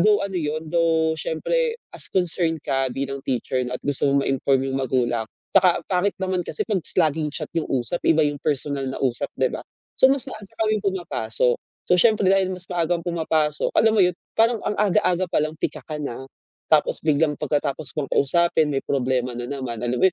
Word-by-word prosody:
though 210 Hz, +2 st, +4 dB
ano 195 Hz, -, -5 dB
'yun, 155 Hz, 0 st, -3 dB
though 165 Hz, -1 st, +2 dB
syempre 470 Hz, -, -1 dB, 0.2 s
as -, -, +1 dB
concerned 170 Hz, -3 st, 0 dB
ka 135 Hz, -2 st, +1 dB
bilang 135 Hz, 0 st, -3 dB
teacher 130 Hz, 0 st, -1 dB
'no 125 Hz, -, -4 dB
at -, -, -21 dB
gusto 145 Hz, 0 st, +1 dB
mo 140 Hz, -, +3 dB
ma-inform 135 Hz, 0 st, +1 dB
yung 135 Hz, 0 st, -1 dB
magulang. 120 Hz, -3 st, 0 dB, 0.3 s
Saka 185 Hz, -2 st, +5 dB
ang -, -, -45 dB
pangit 185 Hz, +2 st, +1 dB
naman 185 Hz, -1 st, 0 dB
kasi 150 Hz, -, -2 dB
s -, -, -52 dB
pag 190 Hz, -4 st, +1 dB, 0.3 s
laging 155 Hz, 0 st, -3 dB
chat 155 Hz, -, -5 dB
'yung, 160 Hz, -, -1 dB
usap 135 Hz, +7 st, -1 dB
iba 160 Hz, -1 st, +5 dB
'yung 145 Hz, -1 st, -1 dB
personal 140 Hz, -2 st, -1 dB
na 130 Hz, -, -5 dB
usap 125 Hz, -3 st, 0 dB
'di -, -, +2 dB
ba, -, -, -5 dB, 0.4 s
so 260 Hz, -, +8 dB
mas 275 Hz, -1 st, +3 dB
maaga 205 Hz, -2 st, -9 dB, 0.2 s
kaming 215 Hz, 0 st, +2 dB
pumapasok, 125 Hz, -, 0 dB, 0.3 s
so -, -, +1 dB
syempre 215 Hz, -1 st, +4 dB
dahil 195 Hz, -1 st, +3 dB
mas 180 Hz, -, -7 dB
maagang 170 Hz, -1 st, 0 dB
pumapasok, 160 Hz, -3 st, 0 dB
alam 220 Hz, -, +5 dB
mo 215 Hz, -, +2 dB
'yun 180 Hz, -1 st, +3 dB, 0.2 s
parang 225 Hz, 0 st, +3 dB
ang 210 Hz, -, -1 dB
aga-aga 185 Hz, -3 st, +2 dB
palang 155 Hz, +1 st, 0 dB
pika -, -, -3 dB
ka 155 Hz, -2 st, -5 dB
na. 135 Hz, -2 st, -5 dB, 0.5 s
Tapos 155 Hz, -2 st, +3 dB
biglang 150 Hz, -1 st, +2 dB
pagkatapos 145 Hz, 0 st, -1 dB
ko 150 Hz, -3 st, -2 dB
kausapin, 160 Hz, +1 st, +3 dB
may 135 Hz, -, +1 dB
problema 125 Hz, -2 st, 0 dB
na 120 Hz, 0 st, -5 dB
naman, 130 Hz, -5 st, -4 dB
alam 120 Hz, 0 st, -1 dB
mo -, -, +4 dB
'yun, -, -, -7 dB
155 Hz, 205 wpm, -23 LUFS, 135-180 Hz, 0.5 s, so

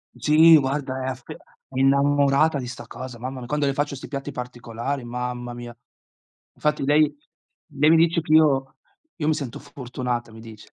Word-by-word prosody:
Sì 160 Hz, +2 st, +6 dB
guarda 135 Hz, -1 st, -2 dB
è -, -, -3 dB
aff 130 Hz, -1 st, -6 dB
è -, -, -6 dB, 0.4 s
innamorata 140 Hz, +2 st, +3 dB
di 125 Hz, -, -5 dB
sta 125 Hz, -, -8 dB
cosa, 130 Hz, -2 st, -8 dB
mamma 130 Hz, +3 st, -6 dB
mia, 120 Hz, -, -8 dB
quando 150 Hz, +1 st, 0 dB
le 140 Hz, -, +1 dB
faccio 145 Hz, 0 st, -2 dB
'sti 135 Hz, -, -9 dB
piatti 140 Hz, -1 st, -5 dB
particolari, 125 Hz, +2 st, -5 dB
mamma 120 Hz, 0 st, -5 dB
mia. 120 Hz, 0 st, -9 dB, 0.8 s
Infatti 150 Hz, -2 st, -1 dB
lei 150 Hz, +1 st, +3 dB, 0.6 s
lei 150 Hz, +3 st, +4 dB
mi 165 Hz, -, +6 dB
dice 165 Hz, +1 st, +3 dB
che: 155 Hz, -, -6 dB
"Io 135 Hz, -4 st, +3 dB, 0.4 s
io 150 Hz, -3 st, -3 dB
mi 155 Hz, -, +4 dB
sento 135 Hz, -6 st, -5 dB
fortunata" 125 Hz, -2 st, -5 dB
mi 110 Hz, -, -12 dB
dice. 110 Hz, -1 st, -13 dB
135 Hz, 180 wpm, -23 LUFS, 125-145 Hz, 0.8 s, Sì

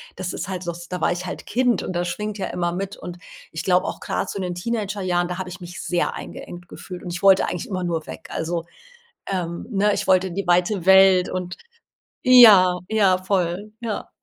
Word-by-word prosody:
das 185 Hz, -1 st, -4 dB
ist -, -, -5 dB
halt 185 Hz, -2 st, -5 dB
so, 175 Hz, -, -3 dB
s 175 Hz, +1 st, -10 dB
da 180 Hz, -1 st, -5 dB
war -, -, +2 dB
ich 180 Hz, +1 st, -3 dB
halt 180 Hz, -, -6 dB
Kind 245 Hz, 0 st, +1 dB
und -, -, -4 dB
das 175 Hz, 0 st, -1 dB
schwingt 210 Hz, +4 st, -4 dB
ja 195 Hz, -, -3 dB
immer 175 Hz, -1 st, -2 dB
mit. 195 Hz, +3 st, -4 dB
Und 175 Hz, 0 st, -9 dB, 0.3 s
ich 160 Hz, -, -5 dB
glaube 180 Hz, -1 st, +3 dB
auch -, -, -5 dB
grad, -, -, -3 dB
so -, -, -5 dB
in 190 Hz, -, -3 dB
den 175 Hz, -1 st, -3 dB
Teenagerjahren, 190 Hz, -4 st, -1 dB
da 180 Hz, 0 st, -5 dB
habe 185 Hz, -1 st, -5 dB
ich 180 Hz, +1 st, -9 dB
mich 175 Hz, -1 st, -8 dB
sehr 175 Hz, -1 st, 0 dB
eingeengt 175 Hz, 0 st, -9 dB
gefühlt 180 Hz, -2 st, -9 dB
und 175 Hz, -, -6 dB
ich 170 Hz, -, -5 dB
wollte 195 Hz, -1 st, +5 dB
eigentlich 180 Hz, -, -5 dB
immer 185 Hz, -2 st, -3 dB
nur 165 Hz, -2 st, -2 dB
weg. -, -, -9 dB
Also, 165 Hz, +1 st, -2 dB, 0.6 s
ähm, 175 Hz, -2 st, -3 dB
ne? 205 Hz, +1 st, +2 dB
Ich -, -, -3 dB
wollte 190 Hz, 0 st, +4 dB
in 175 Hz, -, -8 dB
die 200 Hz, -1 st, -2 dB
weite 175 Hz, +1 st, +2 dB
Welt 190 Hz, -1 st, +6 dB
und 180 Hz, -1 st, -4 dB, 0.7 s
ja, 210 Hz, -8 st, +8 dB
ja 200 Hz, -4 st, +3 dB
voll, 185 Hz, +2 st, -2 dB
ja. 220 Hz, -3 st, -4 dB
185 Hz, 225 wpm, -22 LUFS, 175-195 Hz, 0.7 s, ja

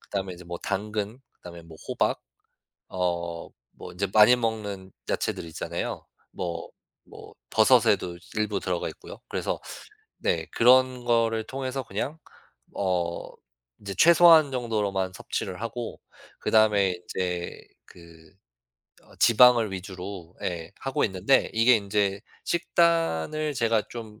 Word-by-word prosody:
그다음에 95 Hz, -2 st, -4 dB
이제 90 Hz, -, -13 dB
뭐 85 Hz, 0 st, -6 dB
당근 105 Hz, +3 st, -3 dB
그다음에 85 Hz, -1 st, -12 dB
뭐 80 Hz, -1 st, -14 dB
호박 -, -, 0 dB, 0.7 s
어 85 Hz, -2 st, -3 dB, 0.3 s
뭐 -, -, -9 dB
인제 95 Hz, +3 st, -2 dB
많이 110 Hz, +3 st, +7 dB
먹는 105 Hz, -5 st, -4 dB, 0.2 s
야채들 -, -, -2 dB
있잖아요. 80 Hz, -, -5 dB, 0.3 s
뭐 85 Hz, -2 st, -5 dB, 0.4 s
뭐 -, -, -13 dB, 0.2 s
버섯에도 110 Hz, -6 st, +3 dB, 0.2 s
일부 105 Hz, -2 st, -1 dB
들어가 90 Hz, -2 st, -2 dB
있고요. -, -, -11 dB
그래서 -, -, -3 dB, 0.6 s
네 80 Hz, -1 st, -1 dB
그런 125 Hz, 0 st, +4 dB
거를 115 Hz, -1 st, +2 dB
통해서 135 Hz, 0 st, -4 dB
그냥 130 Hz, +9 st, -4 dB, 0.6 s
어 90 Hz, -3 st, -1 dB, 0.5 s
인제 100 Hz, -1 st, -7 dB
최소한 165 Hz, -3 st, +7 dB
정도로만 105 Hz, -7 st, -1 dB
섭취를 95 Hz, 0 st, -5 dB
하고 115 Hz, +1 st, -5 dB, 0.4 s
그다음에 105 Hz, -3 st, +3 dB
인제 90 Hz, 0 st, -4 dB, 0.2 s
그 85 Hz, -1 st, -17 dB, 0.7 s
어 -, -, -20 dB
지방을 120 Hz, -2 st, +6 dB
위주로 95 Hz, -2 st, -7 dB
예 85 Hz, -1 st, -4 dB
하고 135 Hz, -1 st, -1 dB
있는데 95 Hz, +6 st, +2 dB
이게 115 Hz, +2 st, +5 dB
인제 100 Hz, -1 st, -1 dB, 1.0 s
식단을 155 Hz, -, -3 dB
제가 115 Hz, -3 st, +2 dB
좀 110 Hz, -2 st, -9 dB
100 Hz, 255 characters per minute, -26 LUFS, 90-115 Hz, 1.0 s, 많이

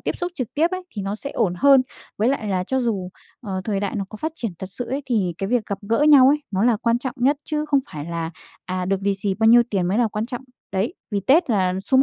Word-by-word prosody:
tiếp -, -, -3 dB
xúc 350 Hz, 0 st, -3 dB
trực 255 Hz, -5 st, -5 dB
tiếp 325 Hz, +4 st, +2 dB
ấy 370 Hz, 0 st, -3 dB
thì 205 Hz, -, -3 dB
nó 195 Hz, +2 st, -3 dB
sẽ 280 Hz, +5 st, -6 dB
ổn 180 Hz, -, 0 dB
hơn. 275 Hz, +4 st, +6 dB, 0.4 s
Với 225 Hz, +4 st, +3 dB
lại 265 Hz, -6 st, -1 dB
là 185 Hz, -2 st, 0 dB
cho 265 Hz, +6 st, 0 dB
dù, 200 Hz, -7 st, -1 dB, 0.3 s
ờ, 195 Hz, -6 st, -4 dB
thời 200 Hz, -3 st, -1 dB
đại 200 Hz, +1 st, -2 dB
nó 200 Hz, -, -2 dB
có 215 Hz, -, -9 dB
phát 315 Hz, +7 st, -3 dB
triển 230 Hz, -, -4 dB
thật 190 Hz, -, -6 dB
sự 245 Hz, -, -4 dB
ấy, 275 Hz, +2 st, -2 dB
thì 200 Hz, -9 st, 0 dB
cái 195 Hz, -, -2 dB
việc 240 Hz, -3 st, +1 dB
gặp 200 Hz, -1 st, -3 dB
gỡ 230 Hz, -, +2 dB
nhau 270 Hz, -3 st, +8 dB
ấy 295 Hz, +1 st, +2 dB
nó 195 Hz, +1 st, +1 dB
là 240 Hz, -2 st, +4 dB
quan 230 Hz, +2 st, +1 dB
trọng 255 Hz, -1 st, -4 dB
nhất, 275 Hz, +4 st, +3 dB
chứ 300 Hz, 0 st, -2 dB
không 280 Hz, -2 st, +3 dB
phải 150 Hz, -1 st, -5 dB
là, 165 Hz, -1 st, -4 dB, 0.4 s
à, 185 Hz, 0 st, -2 dB
được 195 Hz, +1 st, -1 dB
lì 200 Hz, 0 st, +1 dB
xì 195 Hz, 0 st, -2 dB
bao 220 Hz, +2 st, +1 dB
nhiêu 240 Hz, +1 st, +8 dB
tiền 185 Hz, -4 st, 0 dB
mới 200 Hz, +5 st, +1 dB
là 235 Hz, -2 st, +3 dB
quan 210 Hz, +2 st, -3 dB
trọng. 245 Hz, +1 st, -6 dB, 0.3 s
Đấy, 200 Hz, -, -1 dB, 0.2 s
vì 200 Hz, -1 st, 0 dB
Tết 280 Hz, -, +3 dB
là 185 Hz, -4 st, +2 dB
sum 265 Hz, 0 st, +4 dB
220 Hz, 285 wpm, -22 LUFS, 195-265 Hz, 0.4 s, nhau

